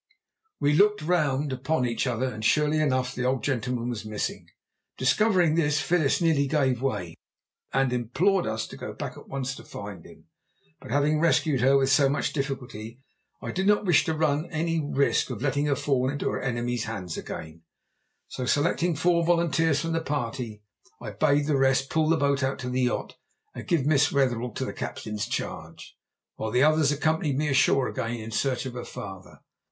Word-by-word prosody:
_" -, -, -68 dB, 0.6 s
We 145 Hz, +1 st, +2 dB
looked 210 Hz, +3 st, +3 dB
round 150 Hz, -5 st, +1 dB
upon 130 Hz, +1 st, 0 dB
each 120 Hz, +2 st, -1 dB
other, 125 Hz, +1 st, -1 dB
and 110 Hz, 0 st, -7 dB
surely 150 Hz, +6 st, +3 dB
enough 130 Hz, -4 st, +1 dB
the 125 Hz, -, -3 dB
old 130 Hz, 0 st, 0 dB
gentleman 125 Hz, -2 st, -1 dB
was 115 Hz, -3 st, -4 dB
missing. 110 Hz, -1 st, -4 dB, 0.5 s
Discovering 180 Hz, -, +3 dB
this, 150 Hz, -2 st, +2 dB
Phyllis 160 Hz, -4 st, +2 dB
nearly 155 Hz, -4 st, +2 dB
gave 130 Hz, -4 st, +1 dB
way, 105 Hz, -11 st, -2 dB, 0.6 s
and 135 Hz, -2 st, +1 dB
implored 165 Hz, -, +1 dB
us 110 Hz, 0 st, -2 dB
to -, -, -10 dB
go -, -, -6 dB
back -, -, -6 dB
at -, -, -13 dB
once 135 Hz, -1 st, -3 dB
to -, -, -11 dB
find 100 Hz, -4 st, -8 dB
him. -, -, -16 dB, 0.5 s
But -, -, -12 dB
having 145 Hz, +2 st, +2 dB
rescued 155 Hz, -4 st, +2 dB
her 135 Hz, +2 st, +5 dB
with 135 Hz, 0 st, +2 dB
so 135 Hz, 0 st, +5 dB
much 140 Hz, -, -1 dB
difficulty 125 Hz, -5 st, -5 dB, 0.4 s
I -, -, -3 dB
did 190 Hz, +1 st, -1 dB
not 210 Hz, 0 st, +3 dB
wish 175 Hz, -6 st, +4 dB
to 160 Hz, -2 st, -1 dB
run 155 Hz, +1 st, +1 dB
any 165 Hz, -1 st, -1 dB
risk 140 Hz, -1 st, +1 dB
of 125 Hz, -1 st, -5 dB
letting 145 Hz, +1 st, +1 dB
her 140 Hz, -, +2 dB
fall 130 Hz, -1 st, 0 dB
into 145 Hz, 0 st, -2 dB
her -, -, -3 dB
enemies' 120 Hz, -2 st, -2 dB
hands 95 Hz, -7 st, -5 dB
again; 80 Hz, +1 st, -7 dB, 0.7 s
so 125 Hz, -, -5 dB
selecting 165 Hz, +4 st, +1 dB
four 170 Hz, +2 st, +2 dB
volunteers 165 Hz, -3 st, +2 dB
from 165 Hz, +1 st, -2 dB
the 165 Hz, 0 st, 0 dB
party, 120 Hz, -7 st, -4 dB, 0.4 s
I -, -, -6 dB
bade 145 Hz, -1 st, +2 dB
the 150 Hz, -2 st, +1 dB
rest 135 Hz, 0 st, +2 dB
pull 155 Hz, -1 st, +2 dB
the 165 Hz, -, +4 dB
boat 140 Hz, -1 st, +1 dB
out 130 Hz, 0 st, 0 dB
to 125 Hz, 0 st, -4 dB
the 130 Hz, +1 st, 0 dB
yacht 125 Hz, -, -2 dB, 0.4 s
and -, -, -8 dB
give 170 Hz, -9 st, +1 dB
Miss 145 Hz, -1 st, +3 dB
Wetherell 125 Hz, -4 st, +1 dB
into 120 Hz, -, -4 dB
the -, -, -5 dB
captain's 105 Hz, -1 st, -4 dB
charge, -, -, -6 dB, 0.4 s
while 110 Hz, -, -3 dB
the 125 Hz, +4 st, +3 dB
others 155 Hz, -1 st, +4 dB
accompanied 150 Hz, -1 st, 0 dB
me 150 Hz, +1 st, 0 dB
ashore 135 Hz, -1 st, +3 dB
again 115 Hz, +1 st, -3 dB
in 110 Hz, +1 st, -7 dB
search 130 Hz, +2 st, -1 dB
of 130 Hz, -, -5 dB
her 125 Hz, -1 st, -6 dB
father. 95 Hz, -1 st, -9 dB
135 Hz, 190 wpm, -26 LUFS, 125-155 Hz, 0.7 s, her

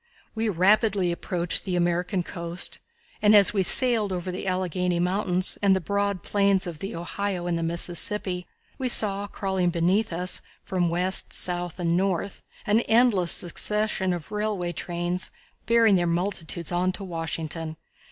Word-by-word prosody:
We 225 Hz, 0 st, -1 dB
rapidly 195 Hz, 0 st, +2 dB
approached 175 Hz, 0 st, 0 dB
the 185 Hz, -3 st, -3 dB
American 175 Hz, +1 st, 0 dB
coast, 170 Hz, -1 st, -4 dB, 0.4 s
and 210 Hz, 0 st, +5 dB
as 200 Hz, -1 st, +7 dB
we 200 Hz, -, +1 dB
sailed 225 Hz, 0 st, +5 dB
over 185 Hz, 0 st, -4 dB
the 185 Hz, +2 st, -6 dB
Alleghany 180 Hz, -1 st, -1 dB
Mountains 185 Hz, 0 st, 0 dB
and 195 Hz, -2 st, +4 dB
the -, -, 0 dB
broad 200 Hz, +1 st, -2 dB
plains 200 Hz, -1 st, +2 dB
of 170 Hz, -4 st, -7 dB
the 195 Hz, -, -6 dB
Ohio 180 Hz, +1 st, -4 dB
and 175 Hz, -1 st, -1 dB
the 165 Hz, -, -2 dB
Mississippi, 180 Hz, +2 st, -2 dB, 0.3 s
we 260 Hz, -1 st, -1 dB
saw 205 Hz, -3 st, +5 dB
crawling 190 Hz, -3 st, -1 dB
beneath 180 Hz, +5 st, 0 dB
us 180 Hz, +2 st, -2 dB, 0.2 s
from 180 Hz, -2 st, -1 dB
west, 180 Hz, +3 st, 0 dB
south 175 Hz, -1 st, -2 dB
and 170 Hz, -1 st, 0 dB
north, 190 Hz, +1 st, -2 dB, 0.2 s
an 210 Hz, +2 st, +3 dB
endless 220 Hz, -7 st, +4 dB
succession 210 Hz, +1 st, 0 dB
of 175 Hz, -3 st, -6 dB
railway 210 Hz, -4 st, -2 dB
trains 175 Hz, +2 st, -3 dB, 0.4 s
bearing 230 Hz, -4 st, +4 dB
their 175 Hz, -1 st, 0 dB
multitudes 170 Hz, -1 st, -3 dB
on 180 Hz, +1 st, 0 dB
to 195 Hz, -, -7 dB
Washington. 165 Hz, -2 st, -4 dB
185 Hz, 150 wpm, -25 LUFS, 175-200 Hz, 0.4 s, as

